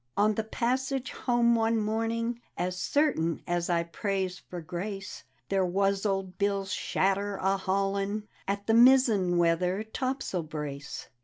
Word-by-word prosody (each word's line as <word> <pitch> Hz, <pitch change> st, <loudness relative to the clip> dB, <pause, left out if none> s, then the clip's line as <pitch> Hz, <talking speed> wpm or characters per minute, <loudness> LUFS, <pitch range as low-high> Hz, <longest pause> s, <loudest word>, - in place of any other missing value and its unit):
" -, -, -40 dB
On 210 Hz, +1 st, +4 dB
the 220 Hz, -, -1 dB
passage 260 Hz, +4 st, -1 dB
home 240 Hz, -1 st, +2 dB
one 225 Hz, 0 st, +2 dB
morning 230 Hz, +2 st, -1 dB, 0.2 s
(As 180 Hz, 0 st, -1 dB
certain 180 Hz, -, +1 dB
as 175 Hz, 0 st, -1 dB
I 170 Hz, -1 st, +2 dB
prays 190 Hz, +1 st, -2 dB
for 180 Hz, -, -8 dB
grace) 190 Hz, +4 st, -6 dB, 0.2 s
There 195 Hz, -1 st, +2 dB
was 195 Hz, +3 st, +1 dB
old 195 Hz, -2 st, -2 dB
Bill's 200 Hz, -1 st, 0 dB
shadder 200 Hz, +1 st, 0 dB
a 190 Hz, +1 st, +1 dB
hauling 195 Hz, +2 st, -1 dB, 0.2 s
At 200 Hz, +1 st, -2 dB
the 225 Hz, -, +2 dB
mizzen 230 Hz, -7 st, +5 dB
weather 180 Hz, +4 st, +2 dB
topsail 255 Hz, -4 st, -2 dB
brace. 150 Hz, -3 st, -6 dB
195 Hz, 145 wpm, -29 LUFS, 180-225 Hz, 0.2 s, mizzen